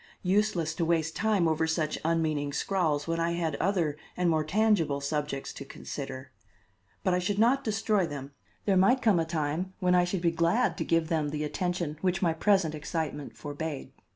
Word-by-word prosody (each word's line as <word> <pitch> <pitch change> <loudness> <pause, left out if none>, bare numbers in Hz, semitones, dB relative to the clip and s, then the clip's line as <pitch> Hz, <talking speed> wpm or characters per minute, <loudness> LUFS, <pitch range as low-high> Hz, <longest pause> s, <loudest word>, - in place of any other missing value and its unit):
Useless 185 -4 +1
to 165 - -2
waste 165 -1 +1
time 210 -6 +2
over 160 0 +1
such 160 -1 -1
unmeaning 155 -3 0
scrawls 155 -4 0
when 165 0 -1
I 170 0 +1
had 165 -3 -1
other 170 -6 0 0.2
and 180 -1 +2
more 155 -1 +2
tangible 180 -5 +2
subjects 145 -1 -3
to - - -7
consider. 135 -1 -7 0.7
But 185 -2 +2
I 180 - +2
should 195 +3 -1
not 250 +6 +3
destroy 215 -3 +1
them. 140 -2 -7 0.3
There 195 - +3
might 200 +8 +4
come 210 -7 +4
a 165 - +1
time 160 +3 -2
when 180 -1 +2
I 180 0 +5
should 180 0 -2
be 170 -1 +2
glad 170 +3 +2
to - - +1
give 165 -1 +1
them 155 -3 0
the 150 +1 -3
attention 170 -1 -2
which 185 0 +1
my 165 -2 +3
present 175 -1 +2
excitement 150 -1 -4
forbade. 145 0 -5
165 Hz, 185 wpm, -29 LUFS, 155-185 Hz, 0.7 s, I